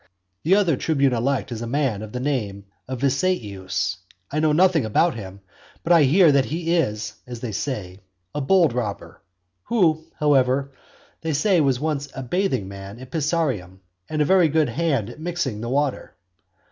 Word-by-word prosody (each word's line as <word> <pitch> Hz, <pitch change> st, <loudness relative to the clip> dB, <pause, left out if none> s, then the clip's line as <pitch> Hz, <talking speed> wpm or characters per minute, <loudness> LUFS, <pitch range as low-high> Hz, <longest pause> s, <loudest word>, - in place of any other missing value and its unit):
The 180 Hz, +5 st, +4 dB
other 180 Hz, -9 st, +2 dB
tribune 140 Hz, -4 st, +1 dB
elect 125 Hz, 0 st, -1 dB
is 115 Hz, -1 st, -5 dB
a 115 Hz, -, -4 dB
man 130 Hz, -5 st, 0 dB
of 110 Hz, -1 st, -8 dB
the 125 Hz, -, -4 dB
name 110 Hz, -8 st, -2 dB, 0.2 s
of 130 Hz, -1 st, -5 dB
Viseius; 105 Hz, -, -1 dB, 0.3 s
I 150 Hz, -, 0 dB
know 155 Hz, 0 st, +3 dB
nothing 170 Hz, -1 st, +4 dB
about 110 Hz, +10 st, +2 dB
him; 100 Hz, -3 st, -9 dB, 0.4 s
but 175 Hz, -, +3 dB
I 160 Hz, -4 st, +6 dB
hear 165 Hz, +4 st, +6 dB
that 140 Hz, -2 st, +3 dB
he 165 Hz, +2 st, -1 dB
is 105 Hz, -10 st, -1 dB
(as 120 Hz, -2 st, -7 dB
they 120 Hz, -, -4 dB
say) 100 Hz, -5 st, -4 dB, 0.3 s
a 150 Hz, -, -2 dB
bold 165 Hz, -1 st, +4 dB
robber; 100 Hz, -8 st, -4 dB, 0.4 s
who, 165 Hz, -9 st, +2 dB, 0.2 s
however, 140 Hz, -2 st, +2 dB, 0.5 s
they 160 Hz, -1 st, -2 dB
say 175 Hz, +4 st, +3 dB
was 135 Hz, -4 st, +2 dB
once 145 Hz, -1 st, -2 dB
a 135 Hz, -, -5 dB
bathing 180 Hz, -, -1 dB
man 100 Hz, +2 st, -9 dB
at 130 Hz, +1 st, -12 dB
Pisaurum, 140 Hz, -, -1 dB, 0.3 s
and 155 Hz, -1 st, +1 dB
a -, -, 0 dB
very 180 Hz, -1 st, +4 dB
good 155 Hz, -2 st, +2 dB
hand 135 Hz, -4 st, 0 dB
at 120 Hz, -, -13 dB
mixing 155 Hz, -10 st, -3 dB
the 120 Hz, -, -4 dB
water. 140 Hz, +1 st, -1 dB
140 Hz, 175 wpm, -23 LUFS, 115-160 Hz, 0.5 s, I